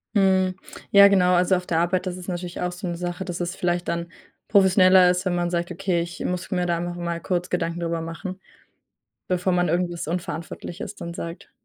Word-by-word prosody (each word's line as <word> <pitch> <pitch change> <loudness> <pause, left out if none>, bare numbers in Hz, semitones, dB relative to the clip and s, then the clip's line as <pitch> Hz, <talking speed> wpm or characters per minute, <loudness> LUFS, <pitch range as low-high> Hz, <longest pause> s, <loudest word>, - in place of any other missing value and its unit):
Mhm, 190 -2 +3 0.4
ja, 200 0 +9
genau, 180 -2 +4
also, 180 +1 +4
auf 180 0 -3
der 165 -2 0
Arbeit, 180 +2 +1
das 180 -1 -3
ist 180 - -10
natürlich 175 -1 -4
auch 180 0 -1
so 180 +2 -7
'ne 175 - -2
Sache, 180 +2 -4
dass 175 -2 -5
es 175 +1 -3
vielleicht 175 -1 -1
dann 170 0 -3 0.4
professioneller 190 -2 +6
ist, 180 +1 0
wenn 185 - +1
man 175 0 0
sagt: 175 0 -2
„Okay, 180 -1 0
ich 170 +1 -6
muss 180 0 -3
mir 180 -2 0
da 170 -1 +1
einfach 175 +1 -4
mal 170 -1 -3
kurz 180 0 -2
Gedanken 170 -1 -1
darüber 165 -1 -2
machen.“ 180 +3 -6 0.9
Bevor 180 0 +1
man 175 -1 +2
irgendwas 175 -1 -1
Unverantwortliches 170 +2 -5
dann 170 -3 -7
sagt. 170 +1 -7
180 Hz, 205 wpm, -24 LUFS, 170-185 Hz, 0.9 s, ja